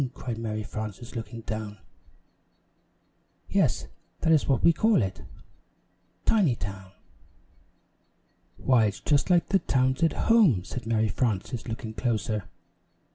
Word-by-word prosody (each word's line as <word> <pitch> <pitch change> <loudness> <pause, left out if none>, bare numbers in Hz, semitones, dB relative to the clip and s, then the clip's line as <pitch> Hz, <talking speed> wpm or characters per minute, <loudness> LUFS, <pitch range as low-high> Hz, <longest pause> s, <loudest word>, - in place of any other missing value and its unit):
cried 115 -3 -5
Mary 110 -1 -3
Frances, 110 +3 -7
looking 115 0 -6
down. 110 -1 -5 1.7
"Yes, - - +1 0.4
that 165 - +2
is 155 -3 +4
what 135 -3 +1
we 170 - +6
call 215 - +3
it 95 0 -4 1.0
Tinytown." 100 - 0 1.6
"Why, 125 -4 +3
it's 105 - -2
just 145 +2 +1
like 175 -2 +3
the 195 - +4
towns 130 -4 +1
at 165 -2 +3
home," 200 - +4
said 120 +4 -7
Mary 110 -1 +2
Frances, 110 +2 -2
looking 115 -1 -5
closer. 110 -4 -1
115 Hz, 120 wpm, -27 LUFS, 110-135 Hz, 1.7 s, we